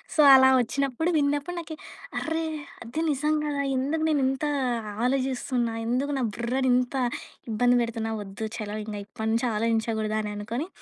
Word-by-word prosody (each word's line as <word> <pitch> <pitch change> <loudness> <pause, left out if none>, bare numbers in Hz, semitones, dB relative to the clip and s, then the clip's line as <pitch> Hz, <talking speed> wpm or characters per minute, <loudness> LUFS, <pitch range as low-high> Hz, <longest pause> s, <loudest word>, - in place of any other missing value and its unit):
So, - - -4
అలా 265 0 +8
వచ్చినప్పుడు 275 +6 0
విన్నప్పుడు 290 +4 0
నాకి 315 -2 -7 0.4
అర్రే! 320 0 -1 0.4
అది 245 +8 -4
నిజం 300 +2 +1
గదా! 285 -1 -1
ఎందుకు 305 +5 0
నేనింత 270 -1 +1 0.6
ఆలోచిస్తున్నా? 255 -2 0
ఎందుకు 270 +4 0
నా 255 - 0
బుర్రని 255 +3 0
ఇంత 250 +1 0 0.6
ఇబ్బంది 245 +3 +3
పెడుతున్నా? 225 -1 -3
వద్దు. 205 +3 -5
చలో 210 -1 -4
ఇంగ 215 -1 -5
ఇప్పటినుంచి 220 +3 -1
ఆలోచించగూడదు 220 -1 0
అని 210 0 -4
అనుకుని 235 - -3
255 Hz, 140 wpm, -26 LUFS, 225-285 Hz, 0.6 s, అలా